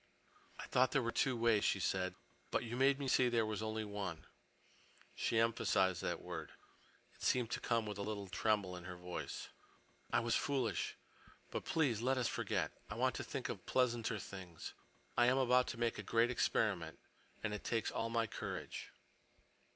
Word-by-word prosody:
"I - - -6
thought 130 +1 +3
there 135 - +4
were 115 - 0
two 130 0 +2
ways," 115 -3 +4
she 95 - +2
said, 95 0 0 0.3
"but - - +1
you 120 0 -4
made 135 +2 +4
me 140 -1 -3
see 130 -1 +4
there 115 -2 +2
was 110 -1 -2
only 110 0 -2
one." 100 -6 -4 0.9
She 115 - 0
emphasized 95 -5 +3
that 85 -1 -2
word. 85 -4 -6 0.6
It - - -22
seemed 125 -3 +2
to - - 0
come 115 -2 +1
with 105 -1 -5
a - - -1
little 100 -1 -3
tremble 100 -2 +1
in 90 -1 -8
her 90 -1 -6
voice. 90 0 -5 0.6
"I - - +4
was 115 0 +1
foolish. 130 -7 0 0.5
But - - -3
please 135 -9 +2
let 130 +2 +2
us 125 -2 +2
forget. - - 0 0.2
I - - -4
want - - +2
to - - -3
think - - -3
of - - -6
pleasanter 120 -3 +2
things. 95 -5 -7 0.4
I 120 - +5
am 130 +2 +4
about 125 -1 +4
to 115 - -4
make 115 -1 0
a - - -1
great 115 +2 +3
experiment, 125 - +1 0.5
and 110 -1 -1
it 105 - -4
takes 115 -2 0
all 115 - -1
my 115 0 +2
courage." 105 - -5
115 Hz, 185 wpm, -37 LUFS, 100-120 Hz, 0.9 s, I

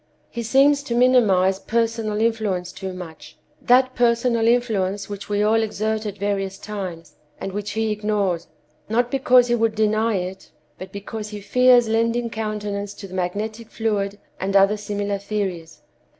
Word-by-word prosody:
He 235 - -4
seems 275 +5 +4
to 245 -4 -3
minimize 205 -7 +4
personal 225 -2 -1
influence 210 -6 0
too 190 0 -6
much—that 185 +9 -1
personal 235 -1 +2
influence 205 -5 +1
which 200 0 -7
we 205 0 +1
all 220 +1 +3
exert 220 0 -2
at 205 -1 -6
various 195 -1 -2
times, 185 -6 -7 0.2
and 195 - -4
which 205 +1 -4
he 220 0 0
ignores, 205 -5 -1 0.4
not 240 +2 +1
because 255 -2 +5
he 240 - +1
would 225 -2 +1
deny 220 +1 +1
it, 185 +1 -5 0.3
but 185 - -8
because 210 +2 -6
he 210 -1 -7
fears 250 +3 +4
lending 230 +1 0
countenance 210 -2 -4
to 200 - -9
the 185 - -13
magnetic 215 +5 -3
fluid 205 -3 -1 0.2
and 195 +1 -2
other 195 +1 +5
similar 205 -1 -3
theories. 195 -5 -4
210 Hz, 150 wpm, -22 LUFS, 195-230 Hz, 0.4 s, because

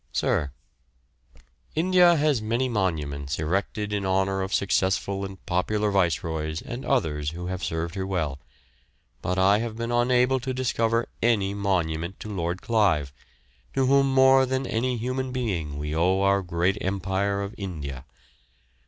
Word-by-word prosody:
Sir, 70 - 0 1.3
India 175 +1 +5
has 150 -6 +2
many 115 +4 0
monuments 75 - -2
erected 100 +6 -2
in 100 -1 -1
honour 95 0 +1
of 95 +1 -3
successful 95 0 0
and 95 -1 -8
popular 105 +4 0
viceroys 80 -4 0
and 120 +2 -7
others 75 - 0
who 90 +1 -6
have 95 +1 -4
served 80 0 -2
her 95 -1 -3
well, 80 -8 -2 0.8
but 90 +1 -1
I 100 +2 +4
have 115 -1 -4
been 115 0 -3
unable 125 +2 +3
to 130 +1 -4
discover 115 -2 0
any 105 -4 +2
monument 90 -3 -1
to 105 - -6
Lord 85 -1 -3
Clive, 90 - +2 0.6
to 135 - +2
whom 135 +1 +4
more 130 0 +5
than 130 +1 -1
any 125 +1 -1
human 130 +3 -2
being 90 - -2
we 75 +1 -3
owe 90 +4 +2
our 100 0 +3
great 90 +2 0
empire 100 +1 -1
of 100 +2 -6
India. 70 -9 -6
100 Hz, 145 wpm, -25 LUFS, 85-120 Hz, 1.3 s, India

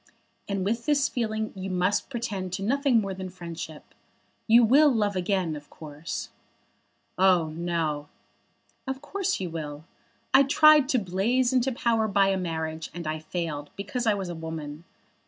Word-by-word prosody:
And 195 -2 -1
with 230 +5 -1
this 290 -2 +3
feeling 220 -2 -2
you 190 0 -5
must 185 +2 0
pretend 210 -8 -4
to 195 - -3
nothing 265 +1 +3
more 195 -2 -3
than 185 0 -6
friendship. 170 -3 -8 0.5
You 235 +2 +7
will 285 +6 +6
love 210 -4 +1
again, 185 -3 0
of 145 0 -10
course." 150 +1 -7 0.9
"Oh, 180 -4 +4
no." 160 -3 -2 0.8
"Of 265 0 -3
course 385 +6 -2
you 180 -3 -4
will. 150 -2 -6 0.5
I 270 - +8
tried 295 0 +6
to 260 - +3
blaze 230 +6 +1
into 255 +1 +2
power 230 -2 +1
by 200 -1 +3
a 195 - +2
marriage, 160 -3 -3
and 175 -1 -6
I 155 0 -2
failed, 155 -3 -4
because 225 +5 -3
I 215 - +4
was 190 -3 -4
a - - -4
woman. 160 -1 -7
190 Hz, 160 wpm, -27 LUFS, 165-235 Hz, 0.9 s, I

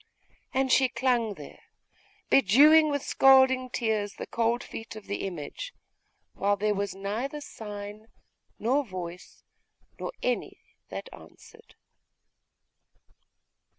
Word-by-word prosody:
And 265 0 +1
she 260 -1 +5
clung 240 -5 0
there, - - -12 0.7
bedewing 295 +7 +6
with 285 -1 -1
scalding 260 -1 +5
tears 220 -4 -1
the - - -6
cold 235 +1 0
feet 225 0 -8
of 215 - -10
the 200 -1 -3
image, 185 - -7 0.6
while 205 +1 +1
there 210 +1 +1
was 200 -1 -3
neither 220 +9 -3
sign, 210 -4 -8 0.5
nor 265 +6 +1
voice, 180 -5 -8 0.6
nor - - -4
any 250 -1 -1 0.3
that - - -6
answered. 455 0 -16
230 Hz, 110 wpm, -28 LUFS, 205-265 Hz, 0.7 s, bedewing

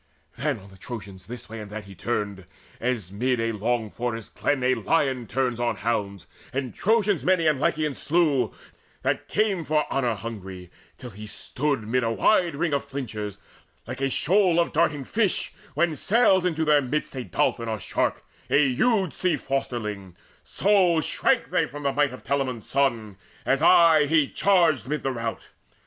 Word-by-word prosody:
Then 140 +1 -1
on 100 -1 -14
the 95 - -17
Trojans 100 -5 -8
this 120 +1 -8
way 115 0 -8
and 105 -1 -8
that 105 0 -7
he 100 - -11
turned, 100 -1 -3 0.3
As 115 -7 -2
mid 125 +4 0 0.2
long 115 -2 0
forest 115 -2 -4
glens 145 -3 0
a 130 +1 +3
lion 135 -6 0
turns 125 0 -1
On 120 0 0
hounds, 100 -6 -2 0.3
and 130 -1 -3
Trojans 210 -3 +1
many 185 -3 +2
and 155 -4 +3
Lycians 150 0 0
slew 145 - +2 0.5
That - - -1
came 205 -5 +1
for 150 0 +1
honour 125 -4 +1
hungry, 95 -5 -8 0.3
till 125 -2 -9
he 105 +2 -9
stood 130 +2 -2
Mid 125 +2 +1
a 115 - +1
wide 170 - +2
ring 155 +1 -1
of 140 - +1
flinchers; 105 -7 -5 0.5
like 130 +3 -7
a 135 - +1
shoal 180 +4 +3
Of 170 - +1
darting 150 -4 +1
fish 205 - 0 0.2
when 165 +1 +1
sails 190 - +3
into 160 -3 0
their 150 -1 +5
midst 145 +3 -2 0.2
Dolphin 115 -1 0
or 110 -1 -2
shark, - - -1 0.2
a 140 -1 +4
huge 195 - +2
sea 180 -1 +1
fosterling; 105 -9 -4 0.3
So 190 -4 +3
shrank 250 - +1
they 170 -3 +2
from 145 +1 -9
the 140 -1 +1
might 145 -2 +2
of 130 - -10
Telamon's 130 -5 -2
son, 115 -8 0 0.3
As 135 +1 +2
aye 165 -3 +6
he 155 -2 +3
charged 170 -10 +2
amidst 150 0 -2
the 135 - 0
rout. 115 -2 -5
135 Hz, 170 wpm, -25 LUFS, 115-160 Hz, 0.5 s, aye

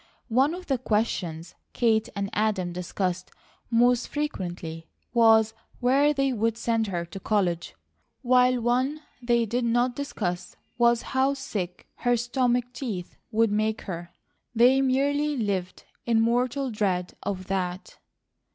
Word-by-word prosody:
One 265 +8 +3
of 365 0 -9
the 270 -6 0
questions 185 -8 -1 0.2
Kate 225 -2 +2
and 200 -1 -3
Adam 205 -5 0
discussed 180 0 -3 0.4
most 245 +1 +3
frequently 175 - -4 0.3
was 225 -2 +5 0.3
where 275 +4 +4
they 275 -2 +1
would 225 0 0
send 230 -1 0
her 175 -3 -2
to 195 +3 -9
college, 185 -5 0 0.5
while 250 0 +4
one 255 +6 0 0.2
they 240 -1 +2
did 240 +3 -1
not 240 +1 +1
discuss 180 -11 -4 0.2
was 235 0 +4
how 265 +1 +2
sick 185 -9 -5
her 245 -1 +2
stomach 245 0 +1
teeth 210 -10 -5
would 225 0 +2
make 215 +1 0
her. 175 -2 -6 0.5
They 250 +4 +5
merely 285 +3 +1
lived 195 -5 -2 0.2
in 230 -1 +3
mortal 245 +3 +1
dread 190 -4 -1
of 185 -2 -4
that. 185 -1 -3
230 Hz, 135 wpm, -26 LUFS, 190-250 Hz, 0.5 s, was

